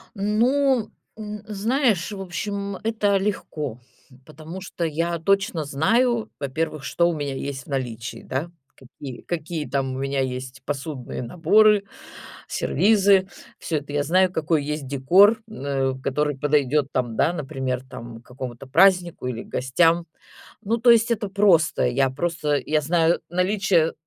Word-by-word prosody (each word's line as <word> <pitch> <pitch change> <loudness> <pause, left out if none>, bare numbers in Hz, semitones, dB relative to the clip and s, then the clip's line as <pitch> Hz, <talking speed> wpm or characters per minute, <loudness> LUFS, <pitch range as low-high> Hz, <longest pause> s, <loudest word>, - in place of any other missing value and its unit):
Ну, 235 +4 +2 0.3
м, 210 -1 -7
знаешь, 215 -2 0
в 200 - -6
общем, 200 +2 -4
это 215 -3 +1
легко, 155 - -3 0.5
потому 155 +4 -9
что 180 -2 -5
я 165 +2 -1
точно 185 -2 +1
знаю, 225 - +1
во-первых, 150 +1 -3
что 170 +5 +2
у 170 - -1
меня 145 -2 -3
есть 135 -1 -5
в - - -26
наличии, 125 -4 -4
да, 140 +6 -3 0.3
какие 130 0 -10
какие 160 -2 -4
там 135 -1 -1
у - - -5
меня 135 0 -1
есть 125 -1 -4
посудные 140 -3 -5
наборы, 200 - +4 0.6
сервизы, 200 -2 +3 0.3
всё 160 - -2
это 145 0 -9
я 145 0 +1
знаю, 185 +4 +3
какой 160 -3 0
есть 150 -1 -4
декор, 185 - +4
м, 215 -11 -9 0.3
э, - - -11
который 145 +2 -1
подойдёт 145 0 +2
там, 120 -3 -1
да, 165 - +2
например, 130 -5 -3
там 115 -2 -9
к - - -32
какому-то 125 0 -8
празднику 175 0 +3
или 120 -2 -3
гостям. 165 +6 +1 0.6
Ну, 225 +2 0
то 240 +1 +5
есть 230 0 +5
это 215 -2 -2
просто. 190 -9 +3
Я 130 +2 +2
просто 150 +1 -1
я 155 0 +2
знаю 165 +2 +2
наличие, 180 -2 +2
160 Hz, 145 wpm, -23 LUFS, 135-195 Hz, 0.6 s, то